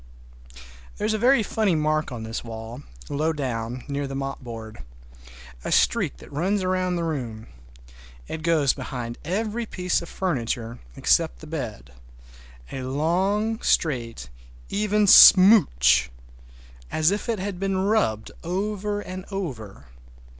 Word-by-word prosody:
There - - -2
is 215 - +1
a 215 - -1
very 245 0 +4
funny 210 -4 +1
mark 155 -1 0
on 115 -3 -6
this 115 +1 -5
wall, 115 +2 -8 0.3
low 155 +3 0
down, 125 -4 -4
near 140 0 -3
the 135 - -6
mopboard. 120 -5 -6 0.8
A - - -4
streak 60 - +2
that - - -14
runs 185 +6 0
round 185 -1 0
the 170 - -2
room. 120 -9 -4 0.8
It 160 - -5
goes 155 -5 +2
behind 120 -3 -6
every 215 +7 -2
piece 180 -3 -1
of 170 - -9
furniture, 120 -9 -3 0.2
except 60 - +2
the - - -11
bed, 60 +1 -6 0.8
a 135 - -5
long, 185 +11 0
straight, 115 - 0 0.4
even 210 +1 +1
smooch, 185 - +7 0.8
as 155 +3 +2
if 205 +4 -3
it 230 - 0
had 190 -1 -4
been 195 0 -1
rubbed 190 - 0
over 205 +3 -2
and 185 -1 -7
over. 130 - -6
160 Hz, 130 wpm, -24 LUFS, 120-195 Hz, 0.8 s, smooch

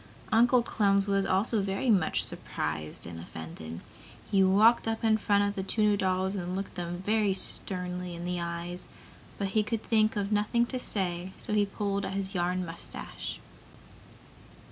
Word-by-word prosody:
Uncle 240 +2 +5
Clem 200 -3 +2
was 195 -1 +2
also 205 +3 +2
very 195 +5 0
much 185 -7 +3
surprised 75 0 -4
and 85 0 -7
offended. 80 0 -8 0.5
He 195 - +4
walked 215 +5 +5
up 225 0 -1
in 220 -1 +4
front 205 0 +3
of 200 - -2
the 195 - -3
two 210 +3 0
new 210 -1 +4
dolls 190 0 0
and 180 -2 -3
looked 195 +1 -4
them 175 0 -4 0.3
sternly 180 -2 -4
in 170 +1 -6
the 180 0 -1
eyes, 170 +1 -5 0.5
but 200 -1 -1
he 215 +2 +3
could 220 +1 -2
think 215 -1 +3
of 200 0 -1
nothing 210 +3 +2
to 255 +2 -4
say 185 -5 -2
so - - -3
he 205 -1 +3
pulled 200 0 -2
at 195 - -3
his 195 0 -2
yarn 180 0 0
mustache. 165 0 -6
195 Hz, 165 wpm, -29 LUFS, 180-210 Hz, 0.5 s, Uncle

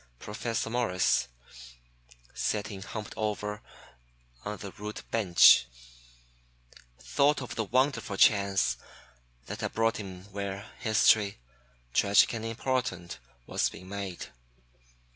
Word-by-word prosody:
Professor 110 - -3
Morris, 110 - +1 1.1
sitting 105 -2 -2
humped 105 +1 -7
over 105 0 -3 0.8
on 105 0 -4
the 100 -1 -8
rude 105 +2 -7
bench, 90 - +6 1.3
thought 140 - +2
of 125 -5 -6
the 110 - -2
wonderful 120 -3 0
chance 100 -2 +3 0.7
that - - -6
had - - -3
brought 115 0 +1
him 95 -3 -8
where 100 +1 -5
history, 110 -2 +3 0.6
tragic 100 +3 +4
and 115 -1 -4
important, 115 -6 -2 0.3
was - - 0
being 90 +1 -12
made. 100 -3 -5
105 Hz, 105 wpm, -29 LUFS, 100-115 Hz, 1.3 s, bench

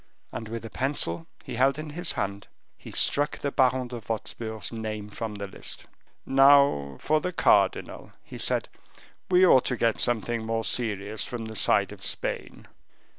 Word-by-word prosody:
And 110 0 -6
with 115 0 -6
a - - -7
pencil 145 +4 -2 0.2
he 125 -4 -6
held 135 +2 +3
in 155 -1 -6
his 175 +3 -1
hand, 100 0 -4 0.3
he - - -12
struck 145 +1 +3
the 140 - -3
Baron 130 -2 +2
de 120 - -6
Wostpur's 110 -1 -5
name 110 -2 -5
from 110 0 -5
the 100 0 -5
list. 95 - -6 0.4
"Now 135 - +4
for 155 +1 +1
the 180 - -2
cardinal," 180 - +1
he - - -10
said; - - +2 0.6
"we 185 0 +6
ought 130 -8 +5
to 125 - -1
get 115 -2 +1
something 120 -1 +1
more 115 0 -2
serious 105 -3 -1
from 120 -2 -5
the 110 0 -8
side - - +2
of - - -11
Spain." - - -3
120 Hz, 170 wpm, -26 LUFS, 110-140 Hz, 0.6 s, we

